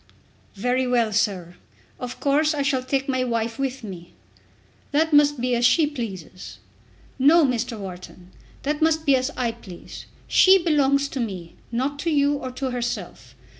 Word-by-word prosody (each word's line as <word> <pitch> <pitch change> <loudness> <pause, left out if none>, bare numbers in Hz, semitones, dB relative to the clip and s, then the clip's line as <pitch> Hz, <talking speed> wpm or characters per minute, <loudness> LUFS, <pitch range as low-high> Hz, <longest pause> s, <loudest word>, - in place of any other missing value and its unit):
"Very 250 +5 0
well, 235 -3 +1
sir. 185 -5 -1 0.4
Of 250 0 -6
course 300 +2 +2
I 285 - 0
shall 275 -2 +1
take 270 +1 -1
my 260 -2 0
wife 230 0 -2
with 270 -2 -3
me." 180 -5 -9 0.8
"That 315 +2 +2
must 290 -1 +5
be 250 +1 0
as 240 0 +1
she 275 +6 +5
pleases." 210 - -7 0.6
"No, 305 +4 +6
Mr. 245 -2 -2
Wharton. 185 -2 -10 0.3
That 295 +2 -2
must 315 0 +2
be 280 -2 +5
as 255 +1 0
I 240 -2 0
please. 205 -7 -11 0.2
She 380 +1 +6
belongs 285 -5 +2
to 270 - -5
me, 190 -8 -5 0.2
not 265 +4 -2
to 335 - -1
you 290 -2 +2
or 275 -3 -4
to 255 +1 -4
herself. 245 -1 -5
255 Hz, 165 wpm, -23 LUFS, 230-285 Hz, 0.8 s, No